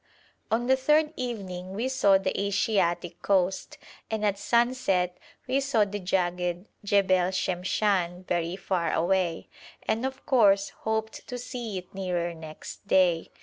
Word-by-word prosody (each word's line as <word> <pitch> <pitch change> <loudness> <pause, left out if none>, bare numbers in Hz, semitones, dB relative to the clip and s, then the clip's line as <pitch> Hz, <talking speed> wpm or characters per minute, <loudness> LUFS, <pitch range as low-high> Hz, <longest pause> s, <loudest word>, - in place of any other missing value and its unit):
On 230 +2 +1
the 265 +1 +4
third 300 +4 +2
evening 190 -7 -5
we 230 +5 -1
saw 230 -7 +4
the 190 0 -2
Asiatic 190 -4 0
coast, 190 -1 0 0.3
and 220 -1 -1
at 200 -1 +1
sunset 205 -6 +1 0.3
we 260 +2 +2
saw 270 -6 +2
the 205 +1 -5
jagged 180 -1 -1 0.2
Jebel 190 -3 +3
Shemshan 185 0 0
very 170 0 -1
far 185 -3 -1
away, 175 -1 0 0.4
and 220 +2 0
of 265 0 -4
course 200 -6 +4 0.2
hoped 220 0 -2
to 250 - -5
see 240 -4 -5
it 180 -1 -9
nearer 180 -3 -2
next 160 +4 -10
day. 180 -4 +3
195 Hz, 140 wpm, -27 LUFS, 180-225 Hz, 0.4 s, the